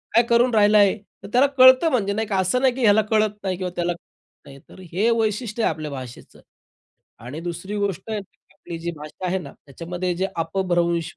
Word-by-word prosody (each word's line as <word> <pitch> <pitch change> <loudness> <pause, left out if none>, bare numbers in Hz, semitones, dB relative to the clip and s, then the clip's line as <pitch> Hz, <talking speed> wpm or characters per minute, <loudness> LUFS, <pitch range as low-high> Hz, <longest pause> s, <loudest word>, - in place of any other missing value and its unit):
"काय 235 - +6
करून 240 +1 +3
राहिलं 210 0 +5
आहे." 205 0 +4 0.3
तर - - -8
त्याला 255 +3 +5
कळतं 260 +5 +7
म्हणजे 200 -6 0
नाही 220 +1 -2
का? 200 - -1
असं 190 +7 +1
नाही 260 -2 +3
की 265 - -5
ह्याला 215 -2 +5
कळत 215 -1 +3
नाही 185 -2 -2
किंवा 180 -1 -4
त्याला 175 0 -1
कळत 170 - -24
नाही. 135 0 -12
तर - - -15
हे 205 +6 +2
वैशिष्ट्य 220 +1 -1
आहे - - +2
आपल्या 155 -1 -7
भाषेचं. 130 -3 -10 0.8
आणि 125 +7 -8
दुसरी 175 +4 -5
गोष्ट 200 -3 -2
आहे 215 - -2 0.3
आपली 170 -1 -9
जी 170 +1 -4
भाषा 150 +5 -8
आहे 185 +1 0
ना, 150 -7 -10
त्याच्यामध्ये 175 +5 -4
जे 190 +2 0
अपभ्रंश 170 -1 -1
190 Hz, 205 wpm, -22 LUFS, 170-220 Hz, 0.8 s, कळतं